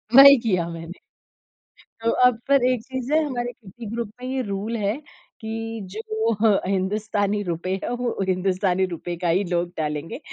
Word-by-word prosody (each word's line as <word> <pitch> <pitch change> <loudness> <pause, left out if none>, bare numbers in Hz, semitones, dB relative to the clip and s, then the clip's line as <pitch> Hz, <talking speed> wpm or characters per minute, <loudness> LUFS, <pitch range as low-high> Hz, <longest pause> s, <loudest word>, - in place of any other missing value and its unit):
वही 280 0 +11
किया 180 -6 +1
मैंने। 165 +2 -8 1.0
तो 230 - +2
अब 250 -2 +4
फिर 275 -2 +4
एक 250 -3 +2
चीज़ 260 +1 -5
है 315 0 +4
हमारे 245 -3 -3 0.4
ग्रुप 230 -2 -3
में 255 - -5
ये 265 0 -1
रूल 205 +3 -3
है 205 +2 0 0.5
कि 225 0 -4
जो 220 +1 -1
अ, 210 -1 +3
हिंदुस्तानी 205 +1 0
रुपए 175 +1 -2
है - - -2
वो 245 -1 -1
हिंदुस्तानी 185 0 +1
रुपए 175 +1 -5
का 175 - +1
ही 185 +4 +3
लोग 175 0 0
डालेंगे, 150 - -3
210 Hz, 165 wpm, -23 LUFS, 185-235 Hz, 1.0 s, वही